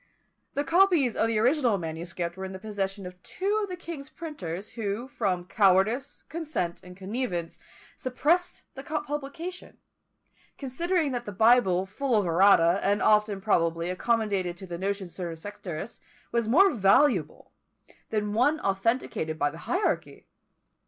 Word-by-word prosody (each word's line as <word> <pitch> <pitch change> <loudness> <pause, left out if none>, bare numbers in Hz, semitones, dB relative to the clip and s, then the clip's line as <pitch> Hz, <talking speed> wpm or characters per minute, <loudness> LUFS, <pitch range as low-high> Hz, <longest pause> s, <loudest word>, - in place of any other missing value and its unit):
The 285 - +1
copies 335 - +3
of 225 - +2
the 225 -1 0
original 245 -1 +3
manuscript 170 +1 -5
were 190 - -7
in 190 - -7
the - - -6
possession 195 -1 -4
of 180 0 -10
two 405 - -1
of 405 - -3
the 365 - -4
king's 330 -5 -8
printers, 205 - -6
who, 220 +2 -3
from 180 -8 -1
cowardice, 200 +6 +2
consent, 305 - -3
and 180 0 -12
connivance, 195 -4 -3 0.4
suppressed 310 +8 0
the 270 - -8
publication; 300 +4 -5 0.8
considering 315 +3 -1
that 245 -1 -3
the 205 - -5
Bible 200 -3 +4
full 245 +6 -1
of 205 -3 +3
errata, 175 0 +5
and 205 +1 +2
often, 210 -2 +3
probably, 170 -3 +1
accommodated 200 -4 0
to 190 - -9
the 170 -2 -6
notions 195 -1 -3
of - - -15
certain 170 -3 -4
sectarists, 195 +1 -7 0.3
was 235 -2 0
more 380 - +6
valuable 235 +7 +2 0.6
than 210 -1 -1
one 285 +8 +3
authenticated 195 -5 -1
by 145 -1 +1
the 165 - -11
hierarchy! 370 +4 -1
210 Hz, 145 wpm, -27 LUFS, 185-275 Hz, 0.8 s, more